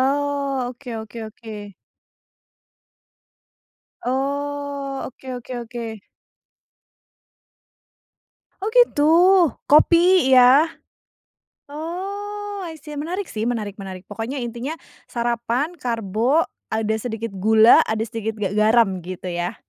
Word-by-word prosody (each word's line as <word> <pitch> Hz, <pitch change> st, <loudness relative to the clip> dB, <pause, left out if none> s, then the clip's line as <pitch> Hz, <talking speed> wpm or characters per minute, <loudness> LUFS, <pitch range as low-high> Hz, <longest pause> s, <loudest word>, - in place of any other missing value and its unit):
Oh, 275 Hz, -1 st, 0 dB
oke 250 Hz, 0 st, -10 dB
oke 220 Hz, +2 st, -10 dB
oke. 210 Hz, -3 st, -10 dB, 2.3 s
Oh, 280 Hz, +1 st, -2 dB
oke 260 Hz, 0 st, -8 dB
oke 245 Hz, +1 st, -9 dB, 0.2 s
oke. 230 Hz, -3 st, -6 dB, 2.6 s
Oh 420 Hz, -, 0 dB
gitu. 480 Hz, -12 st, +5 dB, 0.6 s
Kopi, 340 Hz, +1 st, +5 dB
ya? 260 Hz, +6 st, +7 dB, 1.0 s
Oh 400 Hz, +5 st, -5 dB
I 325 Hz, -, -7 dB
see, 300 Hz, -2 st, -9 dB
menarik 355 Hz, +6 st, -4 dB
sih, 220 Hz, +1 st, -3 dB
menarik 215 Hz, -4 st, -3 dB
menarik. 190 Hz, -2 st, -8 dB
Pokoknya 230 Hz, +6 st, -4 dB
intinya 240 Hz, +6 st, -4 dB, 0.3 s
sarapan, 240 Hz, +7 st, -2 dB
karbo, 230 Hz, -, +1 dB, 0.2 s
ada 220 Hz, 0 st, -1 dB
sedikit 225 Hz, -1 st, -4 dB
gula, 220 Hz, +4 st, +6 dB
ada 220 Hz, 0 st, -1 dB
sedikit 225 Hz, -1 st, -4 dB
ga 205 Hz, -3 st, -2 dB
garam, 215 Hz, -1 st, +3 dB
gitu 180 Hz, +1 st, -7 dB
ya? 175 Hz, 0 st, -2 dB
245 Hz, 100 wpm, -22 LUFS, 220-290 Hz, 2.6 s, ya